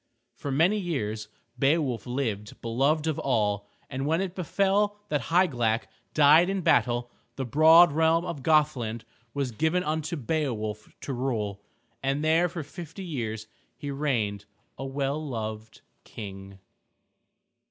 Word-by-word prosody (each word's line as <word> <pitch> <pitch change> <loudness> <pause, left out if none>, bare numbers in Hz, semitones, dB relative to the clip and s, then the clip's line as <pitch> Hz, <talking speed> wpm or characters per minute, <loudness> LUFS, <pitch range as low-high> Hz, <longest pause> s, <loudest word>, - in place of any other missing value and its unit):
For 145 - -6
many 170 +10 +3
years 110 - -3 0.3
Beowulf 135 - +1
lived 115 -5 -3
beloved 140 +7 +1
of 160 -2 -1
all, 105 -5 0 0.2
and 135 +2 -3
when 160 +2 +2
it 190 -2 -2
befell 200 +3 +1
that 145 -6 -1
Hygelac 120 -10 +2 0.3
died 155 +4 +6
in 195 -1 -1
battle, 120 -6 +2 0.2
the 135 - -3
broad 160 +6 +7
realm 160 +3 +3
of 150 -6 -5
Gothland 135 -8 +1 0.3
was 140 -3 -1
given 160 +9 +1
unto 160 +1 -2
Beowulf 115 -7 -2
to 140 - -4
rule. 110 -6 -2 0.4
And 140 +3 0
there 165 +3 +3
for 170 -2 -5
fifty 170 +5 -9
years 110 -9 -4 0.3
he 145 - -5
reigned 115 -8 -1 0.3
a 135 - -5
well 140 +2 -2
loved 110 -5 -5 0.2
King. 95 -2 -9
140 Hz, 130 wpm, -27 LUFS, 115-160 Hz, 0.4 s, broad